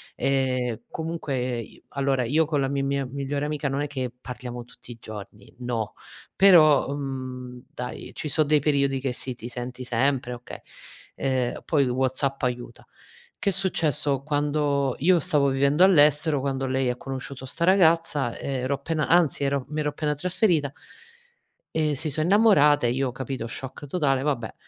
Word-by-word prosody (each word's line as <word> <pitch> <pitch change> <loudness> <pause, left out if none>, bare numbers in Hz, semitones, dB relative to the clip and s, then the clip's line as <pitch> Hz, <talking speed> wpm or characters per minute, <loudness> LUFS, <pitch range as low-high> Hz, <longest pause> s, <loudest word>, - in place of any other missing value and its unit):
Ehm, 130 -4 0
comunque 135 -7 -3
i 115 - -14
allora, 135 -2 0
io 150 +7 +2
con 150 -1 -1
la 135 - 0
mi 140 0 -1
mia 140 0 -1
migliore 140 +2 -3
amica 150 -1 -2
non 135 +1 -2
è 145 - -2
che 130 -4 -4
parliamo 125 -1 -7
tutti 120 - -15
i 120 - -10
giorni. 105 -2 -11
No. 120 -3 -3 0.4
Però, 155 -8 +6
mhmm, 130 -3 -6
dai, 125 0 -7
ci - - -5
so 155 - +3
dei 150 0 +3
periodi 140 -2 +1
che 130 -1 -2
sì, 130 +1 -5
ti 120 - -9
senti 125 +1 -7
sempre, 125 +1 0
okay. 120 0 -9 0.6
Ehm, 130 -2 -1
poi 140 -4 +2
WhatsApp 130 +2 -1
aiuta. 120 -1 -4 0.5
Che 200 - 0
è - - -1
successo: 150 -7 +4
quando 145 -2 0
io 175 +4 +4
stavo 150 -6 +2
vivendo 140 +5 +3
all'estero, 150 -4 +5
quando 135 0 -2
lei 130 -1 0
ha 125 - -1
conosciuto 135 0 -7
'sta 165 +6 -2
ragazza, 165 -8 +3
ero 130 0 -2
appena 150 +3 -2
anzi, 165 -5 +3
ero 140 -1 -1
mi 150 +1 -4
ero 150 - 0
appena 150 0 -2
trasferita. 165 - +1 1.0
E 155 -2 +1
si 155 +3 0
so 155 +3 0
innamorate, 160 - +4
io, 130 +2 -1
capito, 130 -1 -5
shock 130 +4 -7
totale, 135 -4 +1
vabbè, 130 -6 -2
140 Hz, 165 wpm, -25 LUFS, 125-150 Hz, 1.0 s, Però